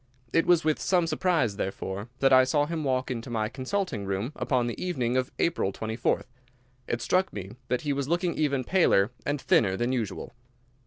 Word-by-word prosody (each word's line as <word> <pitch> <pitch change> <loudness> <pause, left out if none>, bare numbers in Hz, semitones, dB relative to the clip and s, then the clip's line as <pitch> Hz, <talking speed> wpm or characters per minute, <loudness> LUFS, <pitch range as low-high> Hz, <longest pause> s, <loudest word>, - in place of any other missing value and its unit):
It 165 - +3
was 175 -2 +5
with 155 -1 +1
some 180 -3 +2
surprise, 155 - +1
therefore, 95 +2 -4
that 135 -1 +5
I 130 0 +8
saw 145 +3 +2
him 160 0 -3
walk 130 -2 0
into 120 0 -4
my 110 -2 -1
consulting 135 - -2
room 100 +6 -2
upon 125 -3 0
the 120 +6 -4
evening 130 -10 -1
of 130 0 +1
the - - +3
24th 100 - -3
of 110 - -3
April. 110 - +1 0.7
It 120 - -2
struck 185 +1 +2
me 95 -1 -7 0.2
that 125 -1 0
he 145 -1 -1
was 140 -1 -2
looking 175 +2 0
even 140 -4 0
paler 125 - +3 0.2
and 145 0 0
thinner 95 -7 +2
than 120 +4 0
usual. 115 -6 -3
130 Hz, 200 wpm, -27 LUFS, 115-155 Hz, 0.7 s, I